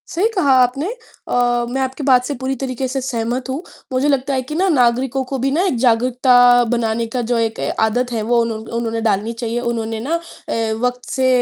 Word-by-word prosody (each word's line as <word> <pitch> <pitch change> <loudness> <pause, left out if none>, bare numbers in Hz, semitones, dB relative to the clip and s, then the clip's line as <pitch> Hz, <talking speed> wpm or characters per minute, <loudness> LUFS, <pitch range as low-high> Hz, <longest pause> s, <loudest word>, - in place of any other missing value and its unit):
सही 370 +6 +1
कहा 290 -8 +3
आपने। 255 +6 +1 0.4
अ, - - -3 0.4
मैं 265 +2 -2
आपकी 265 +2 -3
बात 255 -2 +4
से 285 - -2
पूरी 265 +1 -3
तरीके 260 -1 -2
से 265 +1 -3
सहमत 250 0 -3
हूँ। 270 +4 -3 0.3
मुझे 260 +3 +1
लगता 275 -1 +1
है 260 - 0
कि 265 +4 -7
ना, 375 +4 +2
नागरिकों 260 -2 +2
को 270 +1 -4
भी 270 +2 0
ना, 315 +5 +1
एक 315 -10 0
जागरूकता 245 0 +4
बनाने 230 -1 0
का 250 - 0
जो 240 - +2
एक 225 -1 -1
ए - - -1
आदत 245 +3 +1
है, 230 -2 -1
वो 240 +2 +1
उन्हों 230 -1 -2 0.2
उन्होंने 225 -1 -2
डालनी 215 +1 0
चाहिए। 230 0 -3
उन्होंने 230 -2 -3
ना 280 +9 -1 0.3
अ, 225 -1 -1
वक़्त 250 0 -1
से 260 -1 +1
250 Hz, 215 wpm, -19 LUFS, 230-265 Hz, 0.4 s, बात